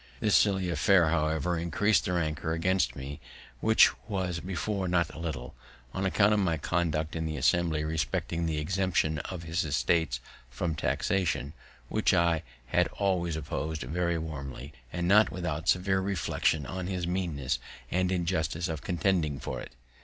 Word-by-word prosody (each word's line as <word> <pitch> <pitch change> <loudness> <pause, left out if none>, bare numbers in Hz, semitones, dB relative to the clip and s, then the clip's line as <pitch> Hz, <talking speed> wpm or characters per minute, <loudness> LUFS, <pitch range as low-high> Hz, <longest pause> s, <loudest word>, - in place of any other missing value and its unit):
This 105 - +3
silly 95 -3 +3
affair, 85 -1 +4
however, 80 0 +1
greatly 85 -1 0
increased 105 +6 +2
his 90 - 0
rancour 80 -1 -1
against 95 +3 +1
me, 70 +2 -7 0.4
which 110 - +6 0.2
was 90 -4 -1
before 95 +2 -2
not 90 -1 +1
a - - -9
little, 75 -7 -5 0.4
on 95 0 0
account 105 +2 +4
of 105 - +3
my 85 -5 +1
conduct 80 -1 -1
in 80 -1 -2
the 80 -1 -3
Assembly 80 +2 +2
respecting 80 +1 -1
the 80 -1 -1
exemption 85 -1 0
of 90 +2 -6
his 85 +2 -1
estate 75 -2 +1 0.3
from 85 +5 -2
taxation, 80 -5 0 0.3
which - - +2
I 85 -2 +3 0.3
had 90 +7 +3
always 90 -5 0
oppos'd 80 0 -3
very 85 +5 0
warmly, 70 -3 -6 0.2
and 90 0 -2
not 105 +3 +6
without 85 -3 -2
severe 95 +1 +3
reflections 85 -5 0
on 95 +3 -4
his 90 -2 -2
meanness 85 -7 -1 0.3
and 90 +1 +1
injustice 85 -2 0
of 80 -2 -3
contending 85 -5 0
for - - -4
it. - - -10
85 Hz, 160 wpm, -29 LUFS, 80-95 Hz, 0.4 s, which